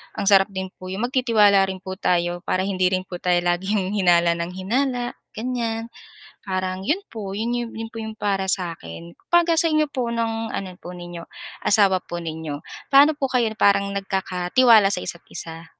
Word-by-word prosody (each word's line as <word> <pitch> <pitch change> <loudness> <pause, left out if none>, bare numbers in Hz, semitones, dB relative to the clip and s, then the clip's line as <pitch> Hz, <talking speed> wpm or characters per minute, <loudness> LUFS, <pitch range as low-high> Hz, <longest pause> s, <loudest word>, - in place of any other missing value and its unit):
ang 210 - -3
sarap 195 -1 +6
din 190 -2 -6
po 185 - -9
'yong 190 +5 -4
magtitiwala 210 -7 +4
rin 190 -1 -6
po 190 0 -6
tayo 175 0 0
para 185 0 +1
hindi 185 -2 +1
rin 185 0 0
po 180 -1 -8
tayo 175 -1 +2
laging 190 +2 0
hinala 175 -3 +4
nang 170 +2 -4
hinala, 245 +5 -1 0.2
ganiyan. 230 -1 -3 0.6
Parang 185 0 -3
'yon 365 +7 0
po 200 -4 -6
'yon 230 0 -3
po 225 - -9
'yong 220 -1 -5
para 195 -3 -1
sa 185 -2 0
'kin. 85 +1 -11
'Pagka 340 -1 +4
sa 335 - +6
inyo 305 -1 +2
po 255 -4 -2
ng 225 -1 -2
ano 195 - -3
po 180 - -9
ninyo, 175 -1 -9 0.4
asawa 200 -3 +5
po 175 0 -5
ninyo, 160 -3 -5 0.3
paano 290 +2 +6
po 275 - +1
kayo 250 -4 +1
parang 200 0 +3
nagkakatiwala 195 +3 +3
sa - - -3
isa't-isa? 165 -1 -7
195 Hz, 175 wpm, -22 LUFS, 180-230 Hz, 0.6 s, sarap